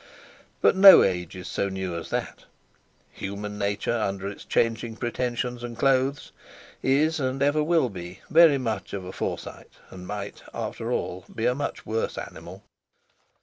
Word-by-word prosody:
But - - +5
no 195 0 +10
Age 90 -3 -1
is 90 -1 -8
so 100 - -1
new 95 -2 -4
as 85 - -6
that! - - -4 0.7
Human 105 +1 -6
Nature, 100 +3 -1
under 100 -3 -2
its 100 - -7
changing 115 0 0
pretensions 120 +1 -3
and 120 -1 -6
clothes, 135 +2 +1 0.5
is 150 +4 +2
and 130 0 -1
ever 145 +2 +2
will 165 -3 +3
be 90 -4 -9
very 160 -3 +6
much 115 -4 -3
of 95 -2 -4
a 90 - -6
Forsyte, - - -6
and 90 -1 -10
might, 100 -1 -6
after - - -4
all, 90 +1 -3
be 115 - -2
a 125 - +3
much 145 +2 -4
worse 110 +1 -2
animal. - - -9
115 Hz, 155 wpm, -26 LUFS, 100-135 Hz, 0.7 s, no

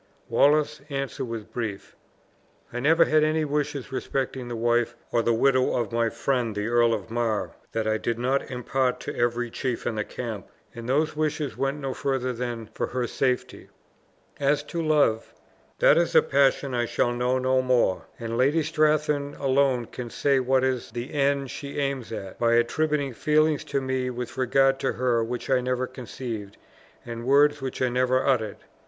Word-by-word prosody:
Wallace's 150 0 +3
answer 135 -1 -3
was 115 -3 -5
brief: 105 -2 -6 0.8
"I 120 - -2
never 160 +6 +5
had 155 0 +3
any 155 0 +1
wishes 145 -2 -2
respecting 130 -1 -3
the 120 - -4
wife 120 +1 +1 0.2
or 120 - +2
the 115 - +1
widow 130 +3 +3
of 115 -4 -2
my 115 0 +1
friend 120 -1 -1
the 105 0 -2
Earl 120 0 +3
of 110 +1 -8
Mar 115 -3 -1 0.2
that 115 -1 -1
I 110 0 +1
did 115 +1 -2
not 130 +3 0
impart 125 0 -1
to - - -5
every 120 0 0
chief 125 -1 -3
in - - 0
the 105 -1 -1
camp, 110 -3 -6 0.3
and 115 +1 -7
those 155 +4 +1
wishes 150 -4 -1
went 135 +4 -1
no 135 -2 -3
further 130 -2 -1
than 120 -1 -4
for - - -2
her 125 -1 -2
safety. 125 +1 -2 0.7
As 145 +1 +2
to 165 +3 -4
love, 150 -8 +1 0.4
that - - +5
is 170 - 0
a - - +7
passion 140 -1 +2
I 120 -1 0
shall 120 +1 +1
know 125 +1 +1
no 130 0 +2
more; 125 -7 +1
and 115 0 -4
Lady 145 +5 +3
Strathearn 150 -2 +1
alone 135 -2 +2
can 120 +1 -7
say 140 +3 +2
what 130 0 +2
is 130 -2 -1
the 120 +2 -6
end 140 -2 +1
she 140 0 -7
aims 135 -4 -2
at, 95 -4 -7
by 115 0 +3
attributing 140 +3 +1
feelings 155 +4 +2
to 140 - -1
me 130 -1 -1
with 120 -1 -5
regard 135 +1 +3
to 135 - 0
her 120 -2 +1
which 120 +3 -4
I 130 -1 +4
never 125 0 -1
conceived, 120 -5 -7 0.5
and 115 -1 -6
words 145 +3 +4
which 130 -1 -3
I 130 - +2
never 130 +1 +1
uttered. 110 -7 +1
130 Hz, 180 wpm, -26 LUFS, 120-140 Hz, 0.8 s, a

